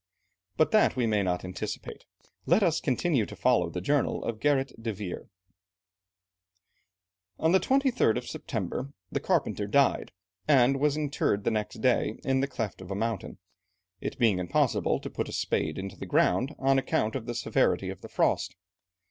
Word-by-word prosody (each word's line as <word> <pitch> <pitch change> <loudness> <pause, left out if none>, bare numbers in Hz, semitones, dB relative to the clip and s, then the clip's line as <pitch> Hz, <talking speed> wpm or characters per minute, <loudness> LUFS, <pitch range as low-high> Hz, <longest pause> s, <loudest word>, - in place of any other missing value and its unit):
But 155 - +3
that 215 - +4
we 125 -2 +1
may 105 -2 +2
not 90 -1 -1
anticipate, 90 0 -6 0.4
let 185 +6 +4
us 170 -3 +2
continue 135 - +1
to - - -9
follow 115 -9 +2
the 90 +2 -5
journal 140 +5 0
of 115 -2 -3
Gerrit 135 -4 0
de 115 0 -2
Veer. 100 -3 -6 2.1
On 160 - +2
the 190 - +5
23rd 255 - +2
September, 135 - -4 0.2
the - - -1
carpenter 105 - 0
died, 140 +6 +2 0.4
and 135 -2 +4
was 150 +1 +2
interred 140 -9 0
the - - +1
next 105 -1 -3
day - - +2
in 135 0 +1
the 135 - +1
cleft 115 -8 -4
of 95 - -10
a 100 - -3
mountain, 110 -1 -3 0.6
it - - -5
being 110 -7 +3
impossible 90 -1 +1
to - - -7
put - - -3
a - - -6
spade - - -1
into 95 0 -5
the - - -7
ground, 125 - +2
on 135 0 +3
account 110 -4 0
of 125 -3 -4
the 120 - -3
severity 120 - +1
of - - -10
the - - -10
frost. - - 0
125 Hz, 170 wpm, -28 LUFS, 105-140 Hz, 2.1 s, the